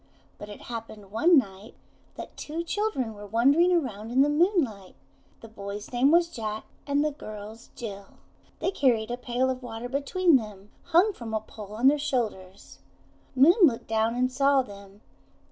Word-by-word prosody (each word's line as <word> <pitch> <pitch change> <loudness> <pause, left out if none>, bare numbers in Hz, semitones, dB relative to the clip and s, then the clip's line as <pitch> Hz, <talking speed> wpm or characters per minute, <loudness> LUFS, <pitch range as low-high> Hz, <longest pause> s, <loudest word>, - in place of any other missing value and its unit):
But 205 - -9
it 205 - -10
happened 220 -4 -8
one 320 - +4
night 200 -3 -2 0.4
that - - -9
two 320 +3 -5
children 340 - -2
were 205 0 -10
wandering 275 - +3
around 230 - -1
in 260 +3 +4
the 290 - +2
moonlight. 295 - 0 0.5
The 225 - -10
boy's 205 -1 -8
name 250 +3 +3
was 340 +2 +4
Juke, 220 -9 -5 0.2
and 285 +1 +1
the 305 - 0
girl's, 215 -3 -10
Bil. 200 -4 -8 0.4
They 375 - 0
carried 240 - +1
a - - -1
pail 250 +1 -1
of 255 0 -6
water 235 -1 -6
between 290 +5 +2
them, 210 -3 -9
hung 350 +5 +3
from 225 -8 -6
a - - +1
pole 210 -1 -11
on 240 +4 +3
their 295 +2 +4
shoulders. 210 -9 -4 0.6
Moon 275 +7 +7
looked 270 -10 +4
down 225 +1 +1
and 255 +1 +1
saw 275 +1 +3
them. 200 -1 -14
240 Hz, 170 wpm, -26 LUFS, 215-285 Hz, 0.6 s, Moon